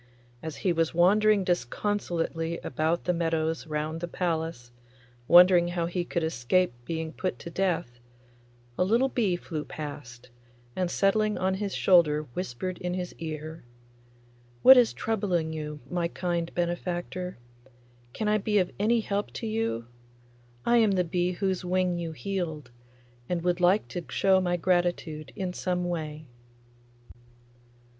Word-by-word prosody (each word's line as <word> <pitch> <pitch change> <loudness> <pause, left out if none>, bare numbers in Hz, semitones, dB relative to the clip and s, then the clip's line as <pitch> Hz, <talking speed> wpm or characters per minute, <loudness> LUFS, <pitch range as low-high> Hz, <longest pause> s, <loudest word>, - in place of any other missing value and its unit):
As 160 -2 -6
he 180 - +4
was 165 0 0
wandering 205 +3 +4
disconsolately 170 -1 -1
about 160 +2 -1
the 180 - +1
meadows 165 -1 -1
round 155 +1 -3
the 175 - -2
palace, 160 -9 -3 0.6
wondering 175 0 +7
how 175 -1 -1
he 175 +1 -2
could 170 -1 -2
escape 160 +2 +1
being 160 +1 -4
put 185 - -3
to 170 - -9
death, 165 -10 -1 0.8
a - - +5
little 235 +8 +3
bee 210 -9 +1
flew 160 -3 -5
past, 125 -5 -8 0.4
and 180 -1 0
settling 210 +3 +2
on 185 +1 +1
his 195 0 -3
shoulder 155 -5 +4
whispered 180 +1 -4
in 180 0 -3
his 180 -1 -4
ear, 160 0 -6 1.0
'What 265 - +11
is 245 -3 +5
troubling 185 -7 -1
you, 150 -1 -6
my 175 -1 -1
kind 170 -1 -2
benefactor? 175 +1 -3 0.7
Can 215 - -3
I 210 0 +3
be 210 +1 +1
of 185 -3 +2
any 225 +3 +3
help 205 -1 -2
to - - -5
you? 220 - -1 0.8
I 240 - +4
am 220 -3 +4
the 180 -1 +2
bee 175 +1 0
whose 190 0 -1
wing 180 -1 0
you 165 -1 -4
healed, 160 -7 -4 0.6
and 175 -2 -1
would 180 0 +1
like 180 +4 +3
to 175 - -5
show 190 -1 +3
my 175 -1 0
gratitude 175 -5 0
in 185 -2 -3
some 180 -1 -1
way. 155 -3 -4
175 Hz, 145 wpm, -27 LUFS, 160-190 Hz, 1.0 s, What